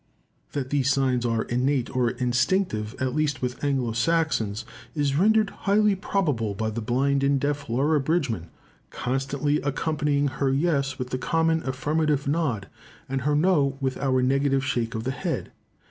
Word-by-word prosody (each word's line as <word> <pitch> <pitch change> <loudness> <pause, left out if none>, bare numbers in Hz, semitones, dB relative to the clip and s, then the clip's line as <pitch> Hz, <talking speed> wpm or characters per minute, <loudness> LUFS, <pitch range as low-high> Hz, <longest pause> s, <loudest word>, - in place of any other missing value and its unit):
That 135 -2 -3
these 140 -2 +2
signs 130 -3 +1
are 115 -1 0
innate 125 +1 0
or 125 -2 +2
instinctive, 125 - 0
at 130 -1 -1
least 150 -4 0
with 125 +2 -3
Anglo 135 -5 0
Saxons, 120 -5 0 0.3
is 145 -2 +1
rendered 215 +5 +3
highly 210 +1 +2
probable 150 - -1
by 110 +2 -2
the 115 +2 -4
blind 135 +5 +1
and 140 0 +3
deaf 145 0 -2
Laura 145 +6 +2
Bridgman 135 - -1 0.4
"constantly 135 +3 -1
accompanying 145 0 0
her 135 0 0
yes 140 -2 +1
with 125 0 -5
the 130 - -1
common 165 +2 +1
affirmative 150 +1 0
nod, 140 -10 0 0.4
and 135 0 -2
her 145 +3 +1
no 145 -4 +2
with 130 -2 -1
our 130 -2 +1
negative 135 +1 +2
shake 120 -1 -1
of 110 - -3
the 130 - -1
head." - - -3
135 Hz, 160 wpm, -25 LUFS, 125-150 Hz, 0.4 s, rendered